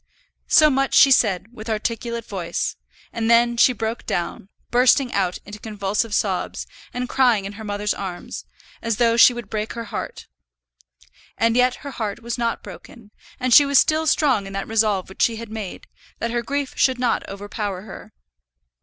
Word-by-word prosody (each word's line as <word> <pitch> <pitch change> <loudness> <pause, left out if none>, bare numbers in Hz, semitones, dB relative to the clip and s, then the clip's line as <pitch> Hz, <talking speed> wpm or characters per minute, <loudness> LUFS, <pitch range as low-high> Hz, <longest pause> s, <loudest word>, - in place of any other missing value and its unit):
So 305 -2 +6
much 270 0 +1
she 275 - +7
said 215 -2 +2
with 220 -1 -9
articulate 230 +1 -3
voice, 175 -4 -3 0.4
and 225 -1 -1
then 235 +1 +4
she 235 - +5
broke 225 -1 -4
down, 175 +2 -3 0.2
bursting 250 +1 +4
out 185 -3 0
into 210 +1 -10
convulsive 210 0 -2
sobs, 190 -3 -1 0.3
and 250 0 -3
crying 245 -6 +2
in 200 - -6
her 220 +2 -9
mother's 205 0 -2
arms 185 -3 -7 0.4
as 230 -2 -1
though 230 -1 +3
she 235 - +8
would 240 -3 -7
break 215 +1 -3
her 235 - -5
heart. 230 - -6 1.1
And 230 0 +2
yet 250 0 +3
her 280 - -5
heart 220 -2 -5
was 235 0 -3
not 235 -1 -2
broken, 205 +4 -12 0.3
and 255 -1 +1
she 290 - +9
was 280 -1 +2
still 315 +3 +3
strong 265 -10 +2
in 195 - -9
that 195 0 -4
resolve 215 -4 +1
which 190 - -9
she 230 - +3
had 225 -1 -8
made, 215 -4 -7 0.3
that 230 - -3
her 240 0 0
grief 285 +3 -3
should 260 -1 +2
not 245 -1 -1
overpower 200 -1 -5
her. 210 - -11
230 Hz, 180 wpm, -22 LUFS, 205-245 Hz, 1.1 s, she